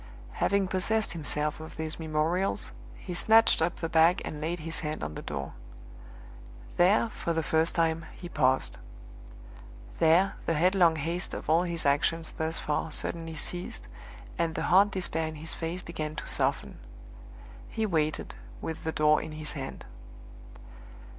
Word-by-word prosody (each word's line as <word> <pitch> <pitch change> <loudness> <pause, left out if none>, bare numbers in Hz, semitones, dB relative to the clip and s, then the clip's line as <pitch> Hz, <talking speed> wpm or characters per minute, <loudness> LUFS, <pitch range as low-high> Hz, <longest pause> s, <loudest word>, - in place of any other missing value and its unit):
Having 200 -1 +1
possessed 215 +4 0
himself 150 -2 -1
of 160 - -10
these 160 +1 -3
memorials, 160 +4 +1 0.2
he 180 - -7
snatched 220 +1 +5
up 170 +1 +1
the 165 - -3
bag 165 +3 +4
and 150 - -6
laid 165 +2 -2
his 165 +1 -1
hand 155 - -4
on 75 +1 -4
the - - -6
door. 70 -2 -5 1.2
There, 200 +6 +4
for 170 -5 -3
the 160 0 0
first 160 +2 +1
time, 165 -1 +1
he 175 - -8
paused. 130 -5 +1 1.2
There, 170 +4 +4
the 165 - +2
headlong 175 0 +4
haste 165 +4 -3
of - - -3
all 165 +2 +5
his 170 -3 -2
actions 155 +3 +1
thus 160 +1 -3
far 150 +2 -1
suddenly 165 +1 -1
ceased, 175 - -4 0.5
and 165 -1 0
the - - -2
hard 200 +2 +7
despair 165 -4 -1
in 155 - -6
his 160 +2 -3
face 170 +2 -4
began 155 -2 -5
to - - -6
soften: - - 0 0.9
he 220 - -1
waited, 155 -6 -1 0.3
with 160 - -5
the 160 - -1
door 150 -1 +3
in 155 -1 -7
his 155 -1 -5
hand. 135 -2 -6
165 Hz, 155 wpm, -29 LUFS, 155-175 Hz, 1.2 s, hard